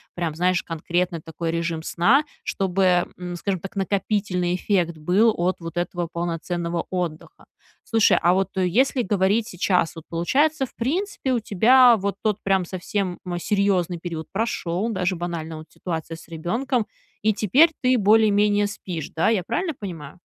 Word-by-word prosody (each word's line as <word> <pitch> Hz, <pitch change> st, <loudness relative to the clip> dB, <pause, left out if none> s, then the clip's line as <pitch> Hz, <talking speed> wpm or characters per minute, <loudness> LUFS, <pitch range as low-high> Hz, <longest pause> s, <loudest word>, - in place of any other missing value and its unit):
прям, 170 Hz, -3 st, -2 dB
знаешь, 180 Hz, +1 st, +1 dB
конкретный 170 Hz, +1 st, -2 dB
такой 165 Hz, +1 st, -4 dB
режим 165 Hz, -1 st, -2 dB
сна, 230 Hz, -, +3 dB, 0.2 s
чтобы, 185 Hz, -2 st, +1 dB
м, 180 Hz, -1 st, -6 dB
скажем 185 Hz, +1 st, -2 dB
так, 195 Hz, -, -9 dB
накопительный 195 Hz, -2 st, 0 dB
эффект 175 Hz, -4 st, 0 dB
был 195 Hz, +8 st, +3 dB
от 180 Hz, +2 st, 0 dB
вот 165 Hz, 0 st, -8 dB
этого 175 Hz, 0 st, -2 dB
полноценного 170 Hz, 0 st, -3 dB
отдыха. 180 Hz, -, -5 dB, 0.4 s
Слушай, 225 Hz, -2 st, +3 dB
а 175 Hz, +2 st, +4 dB
вот 190 Hz, 0 st, +1 dB
если 235 Hz, +8 st, +2 dB
говорить 205 Hz, +3 st, +1 dB
сейчас, 180 Hz, -3 st, 0 dB
вот 165 Hz, -, -9 dB
получается, 270 Hz, -, +1 dB
в -, -, -18 dB
принципе, 290 Hz, -, -1 dB
у 240 Hz, -, +2 dB
тебя 235 Hz, +4 st, +5 dB
вот 200 Hz, -1 st, -2 dB
тот 215 Hz, -1 st, 0 dB
прям 190 Hz, -2 st, +1 dB
совсем, 185 Hz, 0 st, -3 dB
м, 175 Hz, -1 st, -3 dB
серьезный 185 Hz, -3 st, +1 dB
период 160 Hz, -3 st, -6 dB
прошел, 200 Hz, -2 st, -1 dB
даже 185 Hz, -3 st, -1 dB
банально 165 Hz, -2 st, -5 dB
вот 155 Hz, -, -9 dB
ситуация 165 Hz, -1 st, -5 dB
с 165 Hz, -, -14 dB
ребенком, 225 Hz, -, -1 dB, 0.4 s
и 215 Hz, 0 st, +2 dB
теперь 270 Hz, -, +4 dB
ты 255 Hz, 0 st, +3 dB
более-менее 205 Hz, -1 st, +4 dB
спишь, 180 Hz, -6 st, -6 dB
да? 160 Hz, -, +2 dB
Я 210 Hz, -6 st, +1 dB
правильно 320 Hz, -, -2 dB
понимаю? 165 Hz, -7 st, -8 dB
185 Hz, 155 wpm, -23 LUFS, 170-215 Hz, 0.4 s, тебя